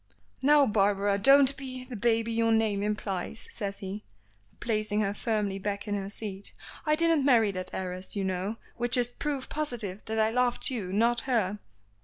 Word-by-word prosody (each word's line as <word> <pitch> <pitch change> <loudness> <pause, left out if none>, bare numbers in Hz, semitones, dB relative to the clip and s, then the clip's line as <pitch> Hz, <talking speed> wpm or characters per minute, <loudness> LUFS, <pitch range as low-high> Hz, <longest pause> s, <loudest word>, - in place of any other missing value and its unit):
"Now, 290 +1 +6
Barbara, 200 -2 +2
don't 275 +4 +6
be 260 -2 -7
the 250 -1 -8
baby 230 +1 +1
your 225 0 +2
name 220 -3 +2
implies," 210 0 -3
says 200 -2 -4
he, 200 +3 -5 0.6
placing 215 -2 0
her 200 -1 0
firmly 205 -3 -1
back 200 +1 -3
in 205 - -1
her 195 -1 -3
seat. 205 -2 -6 0.3
"I 305 - +4
didn't 330 -2 +3
marry 230 -6 +4
that 185 -1 -5
heiress, 185 +1 -5
you 200 - -1
know, 190 +3 -2 0.2
which 240 +2 +2
is 245 -1 +2
proof 275 +1 -4
positive 235 -10 -3
that 220 0 -3
I 220 0 +3
loved 250 +2 +1
you, 205 -8 -3
not 230 +4 +2
her." 210 -4 +1
220 Hz, 175 wpm, -28 LUFS, 200-245 Hz, 0.6 s, Now